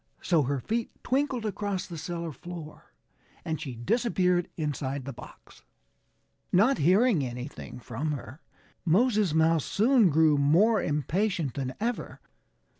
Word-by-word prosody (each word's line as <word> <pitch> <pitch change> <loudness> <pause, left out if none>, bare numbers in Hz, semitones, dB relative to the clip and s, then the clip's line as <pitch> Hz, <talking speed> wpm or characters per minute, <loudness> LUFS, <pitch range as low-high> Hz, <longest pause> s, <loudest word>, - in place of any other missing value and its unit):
So 165 -3 +3
her 140 0 -1
feet 230 - -2
twinkled 260 -3 0
across 205 -2 -2
the 170 - -8
cellar 170 +1 -4
floor 160 +2 -10 0.5
and 160 -1 -3
she 135 -6 -5
disappeared 180 - +1
inside 140 -3 -3
the 140 - -5
box. - - -14 0.9
Not 225 +9 +4
hearing 190 - +4
anything 125 +1 -7
from 130 +6 -3
her, 140 +2 -8 0.4
Moses 205 -1 +2
Mouse 160 -1 +3
soon 230 -1 +4
grew 155 -1 +4
more 195 +10 +4
impatient 155 - -1
than 130 -2 -4
ever. 235 +2 -3
165 Hz, 125 wpm, -28 LUFS, 145-210 Hz, 0.9 s, Not